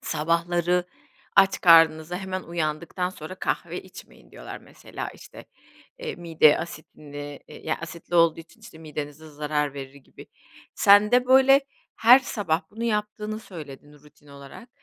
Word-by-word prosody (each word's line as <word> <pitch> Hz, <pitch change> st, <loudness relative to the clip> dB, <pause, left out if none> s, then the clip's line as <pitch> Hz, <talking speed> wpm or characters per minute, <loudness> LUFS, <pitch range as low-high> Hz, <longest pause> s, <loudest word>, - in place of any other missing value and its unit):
"sabahları 175 Hz, +2 st, 0 dB, 0.5 s
aç 195 Hz, 0 st, +4 dB
karnınıza 165 Hz, -1 st, +5 dB
hemen 190 Hz, -1 st, -5 dB
uyandıktan 170 Hz, +2 st, -3 dB
sonra 170 Hz, 0 st, -9 dB
kahve -, -, -4 dB
içmeyin" -, -, -15 dB
diyorlar -, -, -9 dB
mesela, -, -, -9 dB
işte, -, -, -13 dB, 0.5 s
eee, -, -, -5 dB
mide 165 Hz, -4 st, +3 dB
asitine 145 Hz, -3 st, -9 dB
yani 155 Hz, +1 st, -5 dB
asitli 170 Hz, +1 st, -8 dB
olduğu 165 Hz, -1 st, +4 dB
için, 165 Hz, +8 st, -18 dB
işte, 215 Hz, -7 st, -14 dB
midenize 150 Hz, 0 st, -8 dB
zarar 150 Hz, -1 st, -2 dB
verir 135 Hz, -1 st, -8 dB
gibi. 140 Hz, -2 st, -16 dB, 0.5 s
Sen 205 Hz, +2 st, +5 dB
de, 250 Hz, 0 st, +4 dB
böyle, 265 Hz, +1 st, +6 dB, 0.4 s
her 240 Hz, +3 st, +7 dB
sabah 195 Hz, -10 st, -2 dB
bunu 225 Hz, +3 st, -6 dB
yaptığını 210 Hz, -1 st, -3 dB
söyledin 150 Hz, -8 st, -11 dB
rutin 150 Hz, 0 st, -21 dB
olarak. 140 Hz, -, -13 dB
165 Hz, 135 wpm, -24 LUFS, 150-200 Hz, 0.5 s, her